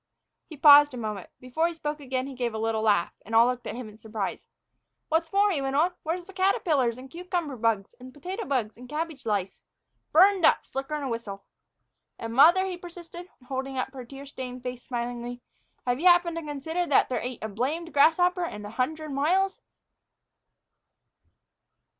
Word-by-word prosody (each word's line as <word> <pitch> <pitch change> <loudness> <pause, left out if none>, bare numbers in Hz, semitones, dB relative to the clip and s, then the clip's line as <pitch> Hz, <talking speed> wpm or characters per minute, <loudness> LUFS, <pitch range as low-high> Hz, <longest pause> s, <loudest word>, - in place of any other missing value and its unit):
He 310 - -10
paused 290 -2 +8
a - - -6
moment. 215 -5 -5
Before 255 +7 0
he 340 - -5
spoke 300 -2 -4
again 260 -2 -3
he 275 - -7
gave 240 -3 -3
a - - -2
little 220 0 -1
laugh, 205 -5 +2
and 225 - -4
all 230 +1 +7
looked 245 -1 -2
up - - -4
at - - -7
him 250 -3 -6
in 215 0 -14
surprise. 215 -3 -5 0.6
"What's 325 +1 0
more," 400 +1 +3
he 300 -7 -1
went 270 0 -2
on, 335 +5 +3
"where's 340 +2 -3
the 390 - -13
caterpillars 315 - +1
and 255 +1 -10
cucumber 340 -2 -4
bugs, 225 -4 0
and 255 +1 -10
the 290 - -18
potato 375 +9 -5
bugs 235 - -1
and 250 +1 -12
cabbage 300 -4 -4
lice? 200 -3 -2 0.5
Burned 380 +3 +5
up, - - +4
slicker 270 +3 -4
'n 295 - -4
a - - -2
whistle. 225 -5 -5 0.7
And 230 0 -6
mother," 340 +9 +6
he 370 -2 -4
persisted, 350 0 -10 0.2
holding 265 0 -4
up 260 +1 -2
her 260 -2 -7
tear 275 +3 -10
stained 255 -2 -8
face 250 -1 -6
smilingly, 240 0 -4 0.5
"have 245 +1 0
you 360 - +3
happened 350 -1 +4
to 330 - -4
consider 320 +4 -3
that 280 - +3
there 255 - -1
ain't 250 -2 -6
a - - -1
blamed 280 +11 -3
grasshopper 355 +5 +4
in 210 -9 -7
a 205 - -7
hundred 310 +6 -2
miles?" 365 +8 +1
275 Hz, 195 wpm, -27 LUFS, 240-330 Hz, 0.7 s, paused